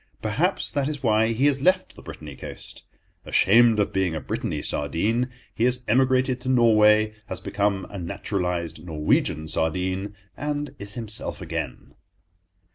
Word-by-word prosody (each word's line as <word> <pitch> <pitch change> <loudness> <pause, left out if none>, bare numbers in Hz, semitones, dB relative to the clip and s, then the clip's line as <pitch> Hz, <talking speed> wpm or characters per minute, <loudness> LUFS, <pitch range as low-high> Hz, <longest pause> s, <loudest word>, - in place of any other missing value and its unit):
Perhaps - - 0
that 140 -1 0
is 150 -2 -4
why 110 -1 +3
he 115 +4 +1
has 140 -2 +2
left 185 +4 +2
the - - -12
Brittainy 75 -3 -9
coast. - - -10 0.4
Ashamed 115 +2 +5
of 100 - 0
being 95 -4 0
a - - -2
Brittainy - - -3
sardine, 105 - 0 0.2
he 115 - +1
has 125 0 +1
emigrated 130 +1 +2
to 130 - -3
Norway, 110 -3 +5
has 95 - -4
become 100 0 -1
a 100 - -7
naturalized 90 -3 -3
Norwegian 80 -1 0
sardine, 90 +5 -1 0.2
and 145 -1 -3
is 100 0 -6
himself 110 -2 -4
again. - - -5
105 Hz, 145 wpm, -24 LUFS, 90-125 Hz, 0.4 s, Ashamed